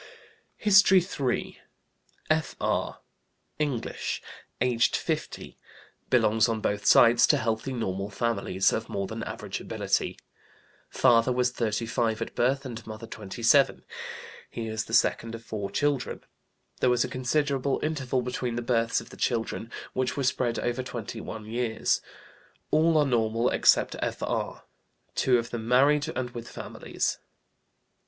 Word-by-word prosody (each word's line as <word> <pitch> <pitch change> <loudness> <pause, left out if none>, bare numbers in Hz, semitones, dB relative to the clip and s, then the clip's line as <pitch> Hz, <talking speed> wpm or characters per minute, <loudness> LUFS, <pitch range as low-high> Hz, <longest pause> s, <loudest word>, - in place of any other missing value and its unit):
HISTORY 195 -2 +6
III. 140 -8 -2 0.7
F.R., 155 0 -1 0.6
English, 140 -7 -2 0.4
aged 120 -1 +2
50, - - -4 0.5
Belongs 110 +2 +3
on 115 -1 -1
both 105 -1 -1
sides 115 0 +7
to - - +4
healthy, 110 +3 -1
normal 100 -5 -3
families, 100 -3 0
of 110 - -3
more 100 0 -2
than 110 +3 -6
average - - -5
ability. - - -1 0.7
Father 120 -1 +4
was 125 0 +1
35 115 -1 -1
at 115 - -4
birth, 135 +3 +1
and 115 -3 -6
mother 110 +1 -7
27. 115 +6 +2 0.7
He 115 - -5
is 110 0 -3
the 115 - -1
second 115 -1 +2
of 115 - -10
four 105 -3 -4
children. 145 -3 -1 0.6
There 125 - +3
was 125 -1 +3
a - - -2
considerable 135 +2 0
interval 135 -5 -1
between 125 -1 -3
the 120 - -2
births 115 -1 +1
of - - -14
the - - -12
children, 115 -1 -2 0.2
which 130 +1 -1
were 140 - 0
spread 125 -2 0
over 120 +1 -1
twenty 120 -4 -6
one 110 -1 -7
years. 115 0 0 0.7
All 160 +1 +4
are 150 - +4
normal, 115 -2 +1
except - - +4
F.R., - - -3 0.5
two 125 -2 +3
of 115 0 -3
them 115 -1 -4
married 145 +5 +4
and 125 -1 -3
with 120 -1 -8
families. - - -3
120 Hz, 135 wpm, -27 LUFS, 115-130 Hz, 0.7 s, sides